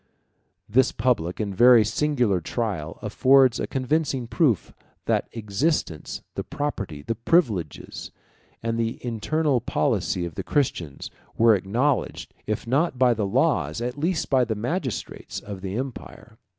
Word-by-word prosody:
This 130 +4 +3
public 110 -8 0
and 100 -3 -2
very 120 0 +7
singular 120 -5 +1
trial 100 -6 -3
affords 130 -2 +4
a - - -2
convincing 135 -1 -1
proof 120 - +1 0.3
that - - 0
the - - -13
existence, 105 - -2
the - - -4
property, 105 - -4
the 115 - -1
privileges, 115 - 0 0.5
and 115 0 -1
the 115 0 -1
internal 130 +4 0
policy 90 -3 0
of 85 - -6
the - - -5
Christians, 90 - -2 0.3
were 115 0 +6
acknowledged, 115 +8 -1
if 110 +2 -2
not 135 +4 +1
by 125 -1 +4
the 105 -3 -1
laws, 75 -4 +1
at 125 +1 -3
least 160 +3 -1
by 130 -2 +5
the 115 -2 -2
magistrates, 125 - -4
of 100 -2 -8
the 95 +2 -4
empire. 125 -3 -7
115 Hz, 140 wpm, -24 LUFS, 100-135 Hz, 0.5 s, very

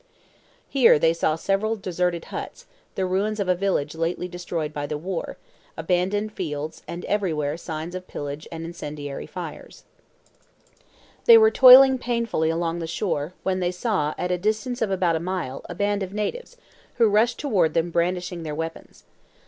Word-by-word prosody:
Here 260 - +5
they 165 +2 +3
saw 160 -2 0
several 200 +6 0
deserted 180 -3 -2
huts, - - -7 0.3
the 190 - 0
ruins 200 +4 -1
of 200 - -1
a 180 - +4
village 180 -6 -1
lately 165 +2 -2
destroyed 170 -3 -4
by 145 -1 -4
the 150 - -3
war, 175 +3 -5 0.4
abandoned 185 +6 0
fields, 155 -4 -5
and 175 +1 -6
everywhere 155 -8 -1
signs 165 0 -6
of 185 0 -7
pillage 145 +1 -6
and 165 0 -6
incendiary 150 -4 -6
fires. - - -9 1.4
They 465 -1 +10
were 440 0 +6
toiling 265 -2 +9
painfully 235 -10 -1
along 165 +1 -1
the 165 - -4
shore, 165 -2 -2
when 185 -1 0
they 175 -1 0
saw, 180 -6 -1
at 180 - -2
a 180 - 0
distance 220 +5 -1
of 220 - +1
about 180 -4 +1
a - - -3
mile, 170 -6 -4
a 175 - -6
band 205 +2 0
of 190 0 -4
natives, 485 - -4 0.4
who 230 - +4
rushed 220 +3 +2
toward 185 - +1
them 170 +1 +1
brandishing 175 +1 -1
their 155 -2 -5
weapons. 165 +1 -7
180 Hz, 165 wpm, -24 LUFS, 160-205 Hz, 1.4 s, They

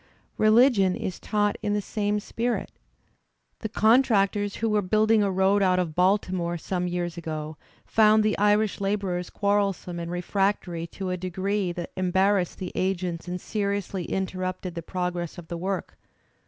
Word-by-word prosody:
Religion 215 -3 +5
is 185 - -4
taught 205 -1 0
in 205 - -1
the 210 - +1
same 205 0 -1
spirit. 230 0 -2 0.9
The 220 - -4
contractors 210 -3 +3
who 225 - -1
were 210 -1 +2
building 215 +3 +3
a 200 - +2
road 190 +2 +3
out 185 -1 +3
of 175 -4 -1
Baltimore, 180 -1 +1
some 180 +2 -2
years 175 -1 -3
ago, 155 -2 -5 0.3
found 215 0 +4
the 215 0 +2
Irish 210 0 +2
labourers 195 -3 -1
quarrelsome 200 -4 0
and 170 0 -5
refractory 175 -1 -1
to 185 +1 -5
a 180 - -1
degree 185 +1 -1
that 175 -1 -6
embarrassed 190 0 +1
the 185 - -5
agents 180 -2 -2
and 180 0 -3
seriously 200 -3 -2
interrupted 185 -1 -3
the 170 - -5
prog 180 +1 -3
ress 175 0 -5
of 170 -2 -10
the 170 - -4
work. 190 +2 -4
190 Hz, 155 wpm, -26 LUFS, 180-205 Hz, 0.9 s, Religion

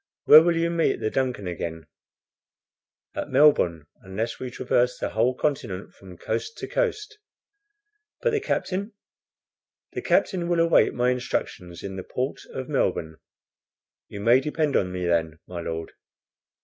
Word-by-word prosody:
"Where 155 - +10
will 170 0 +2
you 170 0 +1
meet 165 -1 +1
the 110 - -1
DUNCAN 125 -6 -1
again?" 80 -2 -5 1.3
"At - - -4
Melbourne, 85 - +4 0.2
unless 105 +5 -4
we 130 - -4
traverse 125 0 0
the - - -2
whole 120 +4 +1
continent 105 -11 -2
from 95 -2 -14
coast 440 - -3
to - - -5
coast." 430 -3 -2 1.0
"But 480 - +1
the 440 - +1
captain?" 200 - -2 1.0
"The - - -3
captain 175 -3 +1
will 175 -1 +2
await 165 0 +4
my 125 +1 +2
instructions 90 -8 -4
in 95 -1 -6
the 95 - -5
port 130 +8 -3
of 130 -1 -5
Melbourne." 85 - -1 0.9
"You 100 - -8
may 120 +4 +5
depend 150 +1 -1
on 90 -1 +1
me 90 -1 -3
then, 80 -2 0
my 90 -1 -6
Lord." 80 -1 -5
125 Hz, 150 wpm, -25 LUFS, -, 1.3 s, Where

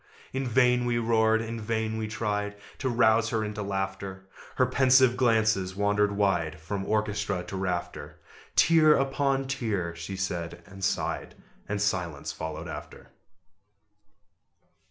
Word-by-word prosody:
In 135 0 -2
vain 125 0 +3
we 120 -1 +1
roared; 110 -1 +2
in 115 0 -5
vain 110 0 -1
we 110 - -2
tried 105 -2 -2 0.2
To 130 - -1
rouse 115 -1 +3
her 110 -1 0
into 105 0 -4
laughter: 95 -1 -4 0.3
Her 130 - +4
pensive 130 -1 +4
glances 110 -6 +2
wandered 105 0 +2
wide 90 -6 0
From 95 +5 -4
orchestra 105 -3 -1
to 95 - -7
rafter 90 -2 -3 0.4
"Tier 155 -2 +6
upon 135 0 +1
tier!" 105 -10 -2
she 85 +3 -6
said, 85 -2 -4
and 95 -1 -11
sighed; - - -1 0.3
And 105 0 -1
silence 90 -7 -1
followed 80 0 -6
after. - - -9
105 Hz, 135 wpm, -27 LUFS, 95-120 Hz, 0.4 s, Tier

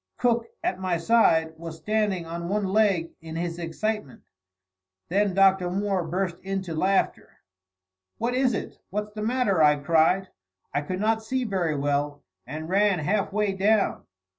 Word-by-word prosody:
Cook, 235 -2 +1 0.2
at 185 - -1
my 185 -2 0
side, 165 -4 +3
was 165 -1 -7
standing 205 -2 0
on 170 +1 -5
one 205 0 0
leg 190 -4 +2
in 160 0 -8
his 170 0 -3
excitement. 170 -1 -3 0.9
Then 200 +1 +1
Dr. 190 -2 +4
Moore 195 0 0
burst 175 +1 -2
into 190 -3 -4
laughter. 190 +5 0 0.8
"What 235 +2 -1
is 255 -2 +2
it? - - -6
What's 210 +1 -4
the 215 - -5
matter?" 220 -6 +1
I 150 -1 +6
cried. 165 +6 +2 0.4
I 145 - +1
could 185 +5 -4
not 220 +1 +2
see 255 +4 -2
very 185 -8 -1
well, 145 +1 -1 0.2
and 155 +4 -6
ran 200 +1 +3
half 195 +7 0
way 210 0 +1
down. 200 +2 +1
190 Hz, 155 wpm, -26 LUFS, 165-210 Hz, 0.9 s, I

